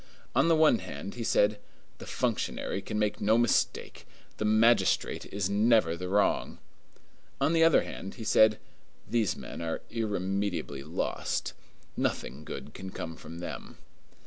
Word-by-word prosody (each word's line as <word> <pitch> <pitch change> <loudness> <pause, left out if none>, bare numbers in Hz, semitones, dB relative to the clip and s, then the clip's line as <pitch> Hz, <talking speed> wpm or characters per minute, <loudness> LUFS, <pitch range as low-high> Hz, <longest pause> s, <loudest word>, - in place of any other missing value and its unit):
On - - +3
the 165 - +5
one 155 -7 +5
hand, 95 +1 -7
he 120 - -5
said, 105 -1 +2 0.4
"The - - -9
functionary - - -2
can - - -4
make 105 -1 0
no 110 +2 +4
mistake; 120 -1 0 0.3
the 110 - -2
magistrate 110 -1 +3
is 100 -2 -2
never 105 -4 +3
the 90 +1 -5
wrong." 100 +1 +1 0.8
On 155 - +2
the 165 -1 +4
other 165 -1 +5
hand, 95 - -7
he 115 - -7
said, 110 0 +5 0.5
"These 110 -7 +1
men - - -8
are 80 -1 -3
irremediably 95 - -2
lost. 75 +4 -2 0.4
Nothing 70 +4 -2
good - - -8
can 95 0 -7
come 80 -3 -6
from 80 +1 -10
them." - - -7
105 Hz, 145 wpm, -29 LUFS, 90-115 Hz, 0.8 s, the